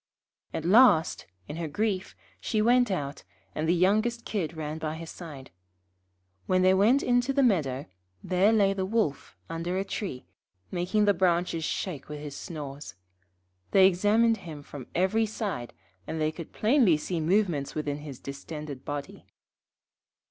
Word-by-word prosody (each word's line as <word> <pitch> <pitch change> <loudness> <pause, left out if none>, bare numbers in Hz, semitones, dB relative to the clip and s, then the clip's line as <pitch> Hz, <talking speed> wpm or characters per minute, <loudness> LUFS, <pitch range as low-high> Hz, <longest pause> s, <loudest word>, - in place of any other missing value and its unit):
At 160 - -4
last, 195 -4 +5 0.2
in 150 - -6
her 165 -1 -3
grief, 195 +4 -2 0.2
she 215 - -1
went 245 +2 +4
out, 145 -7 -3 0.3
and 155 +1 -1
the 175 - +4
youngest 215 +6 +2
Kid 170 -6 -3
ran 155 0 -4
by 155 0 -3
her 165 - -7
side. 155 -5 -10 1.0
When 185 0 +3
they 185 0 +6
went 220 +9 +4
into 245 +2 +2
the 275 0 +2
meadow, 145 - +1 0.4
there 190 +3 +3
lay 200 -3 +4
the 195 -1 -2
Wolf 190 -8 -1
under 165 +2 -3
a 195 - -1
tree, 190 - -5 0.5
making 190 +4 +1
the 205 - +5
branches 175 -2 +1
shake 155 -8 -4
with 150 0 -6
his 145 -1 -7
snores. 145 - -7 0.7
They 190 -1 +6
examined 210 +5 +3
him 155 -7 -9
from 140 -3 -9
every 210 +5 +2
side, 200 - -4 0.4
and 160 - -3
they 155 0 +1
could 160 0 -9
plainly 220 - +4
see 170 +3 -3
movements 165 -4 +1
within 150 -2 -2
his 145 -3 -8
distended 140 0 -7
body. 145 -1 -6
175 Hz, 155 wpm, -28 LUFS, 150-210 Hz, 1.0 s, they